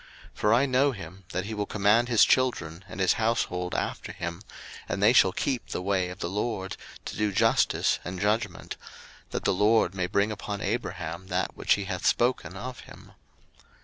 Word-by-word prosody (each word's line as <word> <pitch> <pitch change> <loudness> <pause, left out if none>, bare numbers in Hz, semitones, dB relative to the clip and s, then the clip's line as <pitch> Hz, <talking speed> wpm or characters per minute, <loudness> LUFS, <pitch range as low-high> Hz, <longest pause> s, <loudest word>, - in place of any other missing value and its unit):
01:018:019 - - -27
For 105 +1 +3
I 130 +4 +4
know 135 +1 +3
him, 95 -2 -10
that 90 +1 -2
he 110 - -5
will 105 -1 -2
command 110 +4 +3
his 115 -3 +6
children 95 -10 +1
and - - -8
his 95 -2 +4
household 90 -6 0
after - - -3
him, 85 +1 -5 0.5
and - - -1
they 110 +3 +6
shall 95 -6 +6
keep 130 +4 -2
the - - -4
way 95 -2 0
of 90 - -8
the - - -3
LORD, 95 0 -3 0.3
to - - -5
do 105 -1 0
justice 95 - +2
and 90 +2 -5
judgment; 105 -2 -1 0.5
that - - -4
the - - +3
LORD 105 -1 +3
may 95 -2 -1
bring 100 +3 +1
upon 105 -1 -5
Abraham 95 -5 -3
that 90 0 -1
which - - +2
he 100 - -3
hath 95 -2 -2
spoken 125 +2 +1
of 125 -1 -6
him. - - -14
100 Hz, 190 wpm, -27 LUFS, 90-115 Hz, 0.5 s, his